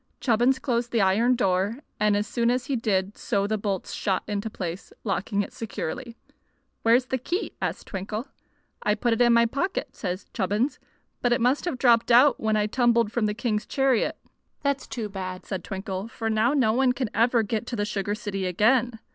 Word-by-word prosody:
Chubbins 245 +2 +3
closed 240 -3 -1
the 230 - +2
iron 220 +6 +3
door, 195 0 +1 0.2
and 210 -1 +3
as 205 - 0
soon 235 +2 0
as 245 0 0
he 275 - -1
did 200 -4 0
so 200 0 0
the 215 +2 0
bolts 200 -3 -3
shot 190 -2 -1
into 210 +1 -2
place, 180 -3 -6
locking 200 0 -1
it - - -10
securely. 230 +2 -5 0.7
"Where's 235 +3 +4
the 260 0 -2
key?" 350 - -2
asked - - -3
Twinkle. 210 +6 -5 0.5
"I 210 - +2
put 235 +2 +1
it 225 - 0
into 240 - +6
my 235 0 +5
pocket," 285 +11 -2
said 185 -1 -4
Chubbins, 210 +7 0 0.4
"but 245 - +1
it 240 - +3
must 255 +7 +2
have 340 -7 -2
dropped 235 -2 +4
out 250 +3 +6
when 220 -1 +1
I 210 - +2
tumbled 235 -1 +2
from 230 -2 +1
the 210 - -2
king's 220 -2 -1
chariot." 270 -4 +1 0.5
"That's 280 -1 0
too 225 -4 -4
bad," 185 -2 -6
said 190 -3 -4
Twinkle; 195 0 -4
"for 225 0 -3
now 220 +4 +2
no 235 -6 +3
one 255 +1 +3
can 250 -4 -3
ever 230 +1 +3
get 220 +2 -3
to 240 - -3
the 205 -2 -1
sugar 205 0 -2
city 200 -4 -3
again. 230 +6 +2
225 Hz, 195 wpm, -26 LUFS, 205-245 Hz, 0.7 s, into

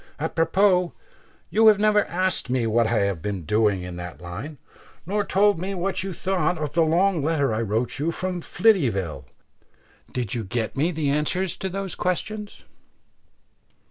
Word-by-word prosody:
Apropos, 180 +3 +2 0.6
you 220 +1 +5
have 215 -2 +7
never 210 -1 +3
asked 185 -5 -1
me 125 -2 +1
what 115 +1 +2
I 115 -2 +1
have 100 -5 -1
been 100 -1 -3
doing 105 +1 +1
in 90 -1 -7
that 85 -3 -7
line; 100 - -7 0.5
nor 205 +4 0
told 200 -1 +3
me 195 +3 -3
what 190 +2 -1
you 195 0 -4
thought 180 0 0
of 150 -2 -4
the 170 - +3
long 170 +2 +2
letter 145 -6 +1
I 110 - -1
wrote 115 +4 -1
you 155 +3 0
from 180 +1 -3
Flityville. 115 - +1 0.9
Did 120 -5 -3
you 115 - -2
get 110 +2 -3
me 150 +5 +1
the 150 -4 -1
answers 160 +5 0
to 190 - -3
those 195 0 -4
questions?" 210 +4 -3
160 Hz, 165 wpm, -24 LUFS, 110-185 Hz, 0.9 s, have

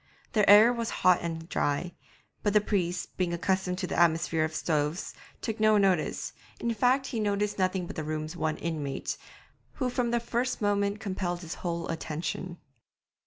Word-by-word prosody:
The 210 -3 +3
air 215 +4 +9
was 230 -2 -2 0.2
hot 180 -1 +7
and 165 -1 -4
dry, 170 +2 -1 0.5
but 205 - +1
the 210 - +7
priest, 180 -4 -2
being 175 -2 0
accustomed 185 +1 0
to 190 - -2
the 175 - -2
atmosphere 165 -2 +3
of 155 0 -2
stoves, 155 +1 -1 0.3
took 225 0 -3
no 215 0 +5
notice, 190 -6 +1 0.3
in 235 0 0
fact, 250 +5 +2
he 245 -4 -3
noticed 205 -1 0
nothing 185 -1 +1
but - - -8
the 155 - -3
room's 155 +2 -4
one 155 -2 -1
inmate, 150 -4 -3 0.6
who 255 -3 -1
from 245 -1 0
the 240 0 +2
first 240 +2 -1
moment 205 0 +1
compelled 185 -4 -3
his 165 -1 -6
whole 170 -1 -2
attention. 165 +2 -4
185 Hz, 170 wpm, -29 LUFS, 165-210 Hz, 0.6 s, air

